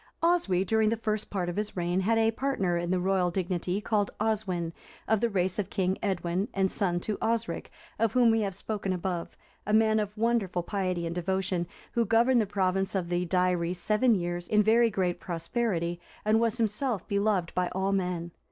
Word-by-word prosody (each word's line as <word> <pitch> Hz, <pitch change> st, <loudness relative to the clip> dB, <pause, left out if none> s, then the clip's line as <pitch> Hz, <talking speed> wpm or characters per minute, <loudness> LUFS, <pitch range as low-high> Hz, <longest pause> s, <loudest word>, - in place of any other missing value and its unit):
Oswy, 330 Hz, -, +2 dB
during 220 Hz, +2 st, +2 dB
the 225 Hz, -, 0 dB
first 215 Hz, -1 st, -2 dB
part 185 Hz, -3 st, -2 dB
of 175 Hz, -, -4 dB
his 210 Hz, -2 st, -3 dB
reign, 175 Hz, +1 st, 0 dB
had 225 Hz, +4 st, +2 dB
a 225 Hz, 0 st, +3 dB
partner 225 Hz, -8 st, 0 dB
in 170 Hz, 0 st, -2 dB
the 185 Hz, 0 st, +1 dB
royal 185 Hz, -1 st, +2 dB
dignity 180 Hz, +1 st, -1 dB
called 210 Hz, -1 st, 0 dB
Oswin, 195 Hz, -6 st, -1 dB, 0.3 s
of 220 Hz, -1 st, +2 dB
the 235 Hz, -, +2 dB
race 185 Hz, -1 st, 0 dB
of 200 Hz, -, -2 dB
King 190 Hz, -2 st, 0 dB
Edwin, 185 Hz, 0 st, -1 dB
and 190 Hz, -1 st, +2 dB
son 180 Hz, -4 st, 0 dB
to 210 Hz, +2 st, -3 dB
Osric(360) 230 Hz, 0 st, -1 dB, 0.3 s
of 225 Hz, -2 st, +2 dB
whom 245 Hz, -2 st, +5 dB
we 225 Hz, 0 st, +2 dB
have 195 Hz, -3 st, -2 dB
spoken 195 Hz, -1 st, -3 dB
above, 180 Hz, -1 st, -4 dB, 0.3 s
a 210 Hz, -, 0 dB
man 220 Hz, 0 st, +4 dB
of 210 Hz, 0 st, -3 dB
wonderful 215 Hz, -6 st, +1 dB
piety 185 Hz, -3 st, -2 dB
and 165 Hz, -, -3 dB
devotion, 185 Hz, 0 st, -1 dB, 0.2 s
who 235 Hz, -, +2 dB
governed 230 Hz, +3 st, +4 dB
the 210 Hz, -, -1 dB
province 195 Hz, 0 st, 0 dB
of 180 Hz, -3 st, -1 dB
the 175 Hz, 0 st, 0 dB
Deiri 180 Hz, -1 st, +1 dB
seven 215 Hz, +6 st, +2 dB
years 175 Hz, -1 st, -3 dB
in 210 Hz, 0 st, +4 dB
very 230 Hz, +2 st, +4 dB
great 180 Hz, -4 st, -1 dB
prosperity, 175 Hz, -1 st, -2 dB, 0.3 s
and 215 Hz, +1 st, +4 dB
was 230 Hz, 0 st, +1 dB
himself 225 Hz, 0 st, -1 dB
beloved 200 Hz, -3 st, 0 dB
by 180 Hz, -1 st, +1 dB
all 190 Hz, +1 st, -1 dB
men. 180 Hz, -3 st, -1 dB
195 Hz, 195 wpm, -28 LUFS, 180-220 Hz, 0.3 s, whom